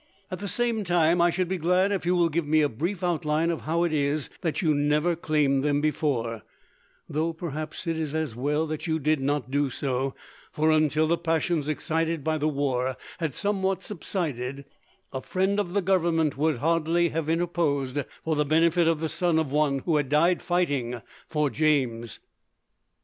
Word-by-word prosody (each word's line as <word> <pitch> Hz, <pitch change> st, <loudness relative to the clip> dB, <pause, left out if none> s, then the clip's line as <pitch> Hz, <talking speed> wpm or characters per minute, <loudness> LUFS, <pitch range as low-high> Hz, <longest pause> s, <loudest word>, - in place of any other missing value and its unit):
At 185 Hz, -, -4 dB
the 205 Hz, -, -4 dB
same 235 Hz, 0 st, 0 dB
time, 175 Hz, -1 st, +3 dB
I 175 Hz, -, +5 dB
should 180 Hz, +1 st, -1 dB
be 185 Hz, 0 st, -2 dB
glad 180 Hz, +4 st, +2 dB
if 190 Hz, -3 st, -2 dB
you 180 Hz, -, +3 dB
will 170 Hz, -1 st, +3 dB
give 165 Hz, -1 st, -1 dB
me 155 Hz, +1 st, +4 dB
a 145 Hz, -, +2 dB
brief 170 Hz, -, -3 dB
outline 165 Hz, -1 st, +1 dB
of 165 Hz, -, -4 dB
how 165 Hz, +3 st, 0 dB
it 170 Hz, -2 st, 0 dB
is 145 Hz, 0 st, 0 dB
that 165 Hz, -3 st, -1 dB
you 160 Hz, -4 st, +2 dB
never 150 Hz, +4 st, +2 dB
claimed 150 Hz, -4 st, +1 dB
them 145 Hz, -1 st, +2 dB
before, 130 Hz, -7 st, -1 dB, 0.7 s
though 160 Hz, +3 st, -1 dB
perhaps 155 Hz, 0 st, -5 dB
it 165 Hz, -1 st, -1 dB
is 155 Hz, -1 st, -3 dB
as 155 Hz, -7 st, -2 dB
well 145 Hz, +5 st, 0 dB
that 155 Hz, +1 st, -4 dB
you 160 Hz, -1 st, +1 dB
did 155 Hz, 0 st, +1 dB
not 140 Hz, -1 st, -1 dB
do 145 Hz, 0 st, +1 dB
so, 130 Hz, 0 st, -2 dB, 0.4 s
for, 155 Hz, +1 st, +2 dB
until 155 Hz, 0 st, +3 dB
the 170 Hz, +2 st, +1 dB
passions 165 Hz, -2 st, 0 dB
excited 160 Hz, 0 st, -1 dB
by 155 Hz, +1 st, 0 dB
the 150 Hz, -, +1 dB
war 130 Hz, -3 st, -1 dB, 0.2 s
had 160 Hz, -6 st, -2 dB
somewhat 195 Hz, -2 st, 0 dB
subsided, 140 Hz, -, -4 dB, 0.5 s
a 130 Hz, -, -3 dB
friend 190 Hz, +5 st, 0 dB
of 180 Hz, -4 st, -2 dB
the 200 Hz, -, +2 dB
Government 170 Hz, -5 st, +2 dB
would 155 Hz, 0 st, +1 dB
hardly 165 Hz, +4 st, +2 dB
have 160 Hz, -1 st, -3 dB
interposed 160 Hz, -5 st, 0 dB, 0.2 s
for 160 Hz, -1 st, 0 dB
the 150 Hz, -, +2 dB
benefit 165 Hz, +3 st, +3 dB
of 165 Hz, -2 st, +1 dB
the 160 Hz, -, 0 dB
son 170 Hz, 0 st, +1 dB
of 160 Hz, -4 st, 0 dB
one 145 Hz, -2 st, +1 dB
who 165 Hz, -3 st, +2 dB
had 145 Hz, -3 st, -1 dB
died 170 Hz, +5 st, +3 dB
fighting 145 Hz, -9 st, 0 dB, 0.3 s
for 150 Hz, -3 st, 0 dB
James." 125 Hz, -5 st, 0 dB
155 Hz, 190 wpm, -26 LUFS, 145-170 Hz, 0.7 s, I